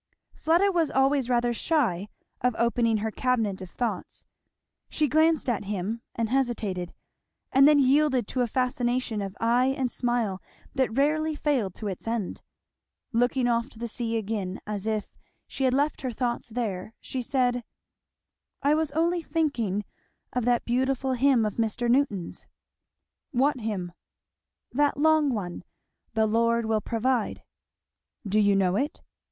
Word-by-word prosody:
Fleda 345 +5 +3
was 335 -4 +1
always 270 -1 +2
rather 240 -1 +2
shy 230 - 0 0.3
of 250 -1 +1
opening 235 -1 +2
her 220 +1 -2
cabinet 225 -6 0
of 185 - -7
thoughts. 220 -5 -4 0.6
She 305 - +1
glanced 315 +1 +3
at 230 -5 0
him, 205 +3 -3
and 230 -1 0
hesitated, 220 -9 -1 0.6
and 275 +2 +7
then 300 -1 +6
yielded 270 -3 +3
to 255 - -1
a 245 - +2
fascination 245 -2 -1
of 195 0 -6
eye 240 +3 +3
and 255 -2 -1
smile 235 -6 -1 0.3
that 260 -3 0
rarely 310 +2 +2
failed 260 - 0
of - - -1
its 190 +2 -5
end. 225 -4 -2 0.7
Looking 245 +2 +2
off 235 +1 +1
to - - -15
the 235 +1 -4
sea 230 0 -2
again, 205 -3 -3
as 210 0 -4
if 215 -1 -2 0.3
she 270 - -2
had 255 - +3
left 290 +2 0
her 260 -2 -2
thoughts 240 0 -2
there, 220 -3 -4
she 260 - -4
said, 245 -1 0 1.0
"I 285 +2 +4
was 310 -1 0
only 340 +2 +1
thinking 250 - -1 0.5
of 250 -2 0
that 245 -1 +2
beautiful 260 +2 0
hymn 255 -2 +3
of 210 - -3
Mr. 230 +1 0
Newton's." 235 -8 0 0.8
"What 270 +1 +1
hymn?" 205 -6 -3 0.8
"That 290 +2 +2
long 310 0 +4
one, 185 -7 -4 0.5
'The 220 0 +3
Lord 230 +1 +2
will 220 -1 +1
provide.'" 235 +1 -1 0.8
"Do 205 +2 +2
you 205 -1 +4
know 190 -1 +2
it? 290 +7 -2
240 Hz, 150 wpm, -27 LUFS, 215-270 Hz, 1.0 s, and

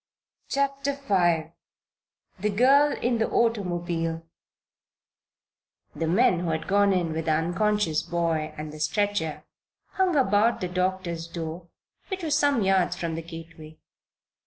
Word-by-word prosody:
CHAPTER 275 0 0
V 175 - +1 0.9
THE 210 - +1
GIRL 275 +7 +4
IN 240 -1 +1
THE 225 - +1
AUTOMOBILE 175 -7 -1 1.7
The 165 - -2
men 185 +1 +3
who 175 -1 -2
had 160 0 -2
gone 200 +1 +3
in 175 -4 0
with 160 0 -3
the 160 - +2
unconscious 175 +1 +1
boy 165 -2 -1
and 150 0 -6
the 155 - -9
stretcher 200 0 -1 0.5
hung 375 -3 +1
about 230 -3 +3
the 180 -4 -3
doctor's 180 -2 -2
door, 165 +1 -6 0.4
which 380 -2 -5
was 305 -2 +1
some 280 -6 +2
yards 190 -1 +2
from 165 -1 -3
the 165 - -4
gateway. 165 -1 -11
180 Hz, 135 wpm, -26 LUFS, 165-225 Hz, 1.7 s, GIRL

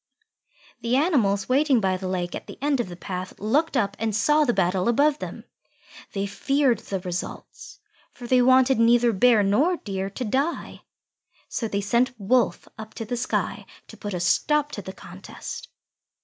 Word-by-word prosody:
The 235 +2 0
animals 240 - +2
waiting 270 0 +3
by 190 -3 +1
the 185 0 -5
lake 180 -1 -2
at - - -7
the - - -10
end 285 -1 0
of 235 - -2
the 175 - -8
path 185 +1 -6
looked 280 +8 +1
up 200 -4 0
and 220 -1 -1
saw 300 +7 +3
the 245 - +2
battle 185 0 +1
above 285 +5 +3
them. - - -7 0.7
They 195 0 -1
feared 260 +4 +1
the 195 - -4
results, 180 -1 -7 0.3
for 245 - -11
they 250 +1 +4
wanted 260 0 +4
neither 235 0 +4
Bear 225 +1 +4
nor 280 - +2
Deer 195 -5 -4
to 250 +6 -5
die. 275 +9 -2 0.7
So 230 - -2
they 200 -1 -2
sent 240 +4 0
Wolf 240 +5 +1
up 220 0 -9
to 225 - -5
the 245 - -3
sky 240 +1 -2 0.2
to - - -11
put 205 -2 -5
a - - -2
stop 295 - +1
to - - -5
the - - -8
contest. - - -9
230 Hz, 175 wpm, -24 LUFS, 195-265 Hz, 0.7 s, they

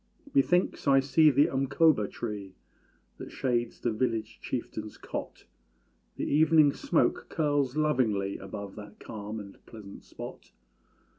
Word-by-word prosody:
Methinks 180 - +2
I 135 -1 +6
see 140 +3 +4
the 140 +1 +4
umkóba 135 - +2
tree 100 -4 -6 0.6
That - - -8
shades 120 -2 -1
the 120 - 0
village 110 -1 -2
chieftain's 110 -3 -5
cot; - - -7 0.7
The - - -3
evening 155 -1 +5
smoke - - 0
curls 145 -3 0
lovingly 115 -10 +1
Above 95 0 -7
that 105 0 -11
calm 105 +1 -6
and 100 -2 -12
pleasant 105 -3 -11
spot. - - -10
120 Hz, 125 wpm, -29 LUFS, 105-145 Hz, 0.7 s, I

